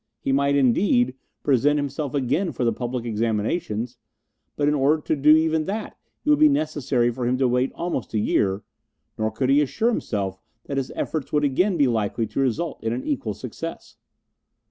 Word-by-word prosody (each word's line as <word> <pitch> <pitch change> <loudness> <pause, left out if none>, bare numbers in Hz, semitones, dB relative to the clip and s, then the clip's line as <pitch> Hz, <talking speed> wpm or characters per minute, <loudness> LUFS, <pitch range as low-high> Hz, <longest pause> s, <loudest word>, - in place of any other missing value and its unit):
He 135 - -2
might, 140 +1 +2
indeed, 175 - +3 0.3
present 145 +2 +3
himself 145 0 -3
again 150 +7 0
for - - -2
the 115 - +2
public 120 +1 -4
examinations; 115 +2 -2 0.6
but 145 - 0
in 150 - +3
order 145 +2 +3
to - - 0
do 145 +1 +2
even 160 -1 +1
that 210 +3 -4 0.3
it - - 0
would 295 - +4
be 305 0 +7
necessary 145 - +1
for 120 0 -3
him 125 +1 +1
to 130 -1 +2
wait 125 +2 +1
almost 170 -10 -3
a - - +2
year, 100 -1 +1 0.6
nor 110 0 +1
could 130 +4 0
he 145 +2 +5
assure 220 - +1
himself 100 - -2 0.3
that 140 - -4
his 135 -1 -2
efforts 155 -4 -3
would 150 0 +2
again 175 +7 +2
be 145 - +4
likely 115 -1 0
to - - -5
result 135 +5 -1
in 115 0 0
an 125 - -4
equal 290 - -2
success. - - -7
135 Hz, 190 wpm, -24 LUFS, 120-155 Hz, 0.6 s, be